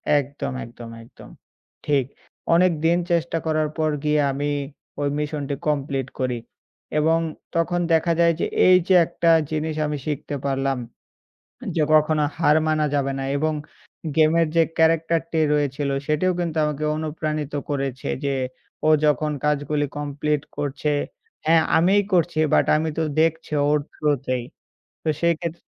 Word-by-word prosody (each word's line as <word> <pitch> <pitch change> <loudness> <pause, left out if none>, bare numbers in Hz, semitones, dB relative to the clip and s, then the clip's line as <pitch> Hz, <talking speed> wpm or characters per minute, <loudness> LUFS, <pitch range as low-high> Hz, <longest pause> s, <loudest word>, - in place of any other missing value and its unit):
একদম, 140 -1 -2
একদম, 115 0 -10
একদম। 115 - -15 0.6
ঠিক। 140 -3 +2 0.5
অনেকদিন 170 -1 +3
চেষ্টা 170 -1 +1
করার 155 -1 +1
পর 155 -1 +1
গিয়ে 150 0 +2
আমি 145 +2 -2 0.5
ঐ - - 0 0.2
মিশনটি 145 -1 -3
কমপ্লিট 140 -3 -1
করি। 125 -2 -1 0.6
এবং 160 +2 +3 0.4
তখন 170 +1 +1
দেখা 165 +1 +3
যায় 170 0 +5
যে, - - +1 0.2
এইযে 185 0 +5
একটা 170 0 0 0.2
জিনিস 155 0 -2
আমি 150 0 -2
শিখতে 145 -1 -3
পারলাম 135 -1 0 1.0
যে, 160 - +2
কখনো 155 0 +4
হার 155 -2 +4
মানা 155 -1 +2
যাবে 140 -1 0
না 135 - -3
এবং 155 +1 0 0.6
গেমের 160 +1 +4
যে 165 - +6
ক্যারাক্টার 165 0 +3
টি 160 - +1
রয়েছিল 145 -1 0 0.2
সেটিও 155 +5 +2
কিন্তু 165 -2 -2
আমাকে 150 0 -2
অনুপ্রাণিত 155 -1 -3 0.2
করেছে 135 -3 -3 0.2
যে 140 -1 0 0.5
ও - - +5 0.2
যখন 150 0 +2
কাজগুলি 145 0 0
কমপ্লিট 145 0 -1 0.2
করছে 145 +1 -1 0.5
হ্যাঁ 160 0 +5
আমিই 190 +5 +4
করছি 170 -2 +2 0.2
বাট - - +4
আমি 160 +1 -1
তো 165 - +1 0.2
দেখছি 165 -1 0 0.2
ওর 150 0 +3
থ্রুতেই। 130 -4 -1 0.6
তো - - -3
সেইক্ষেত 170 -1 0
150 Hz, 140 wpm, -23 LUFS, 145-165 Hz, 1.0 s, যে